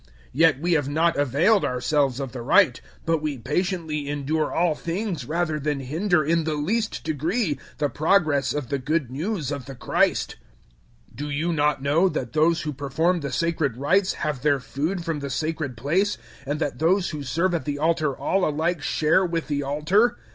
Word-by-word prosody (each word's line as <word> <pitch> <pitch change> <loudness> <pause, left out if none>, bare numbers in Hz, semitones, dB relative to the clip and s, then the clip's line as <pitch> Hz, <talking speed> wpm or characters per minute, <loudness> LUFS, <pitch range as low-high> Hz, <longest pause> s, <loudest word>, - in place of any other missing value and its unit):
Yet 155 -1 +4
we 175 +3 -1
have 145 -4 +1
not 165 +3 +2
availed 150 - +3
ourselves 130 +1 +1
of 135 -3 -4
the 125 - -6
right, 165 +10 +4 0.2
but 165 -2 +1
we 150 -3 -2
patiently 150 +2 -2
endure 145 +2 -1
all 170 -1 +2
things 170 - -3
rather 155 0 -1
than 145 -1 -1
hinder 155 +5 +1
in 165 +1 +2
the 155 -1 -1
least 195 - -1
degree 155 - -1 0.2
the 150 - +1
progress 155 -3 +2
of 145 -5 -3
the 140 - -1
Good 140 -1 -1
News 155 - -3
of 140 -2 -5
the 135 - -8
Christ. 120 - 0 0.7
009:013 - - -19
Do 145 +2 -4
you 155 +4 -1
not 150 -3 +1
know 160 +7 +3
that 125 -8 -4
those 160 +2 +2
who 150 - -3
perform 155 +6 0
the 140 -3 -4
sacred 160 -5 0
rites 185 +8 +2
have 150 -5 -3
their 145 -2 +2
food 160 +7 -3
from 165 -3 -2
the 140 -1 -5
sacred 155 -2 -3
place, 180 - +1 0.3
and 145 +2 -2
that 145 -3 -2
those 180 +4 +2
who 150 -2 -5
serve 165 +7 0
at 165 -6 -1
the 145 -1 -2
altar 155 -2 +1
all 195 -1 0
alike 160 +2 -1
share 155 +5 +2
with 165 -3 -2
the 145 -1 0
altar? 165 - +2
155 Hz, 190 wpm, -24 LUFS, 140-170 Hz, 0.7 s, Yet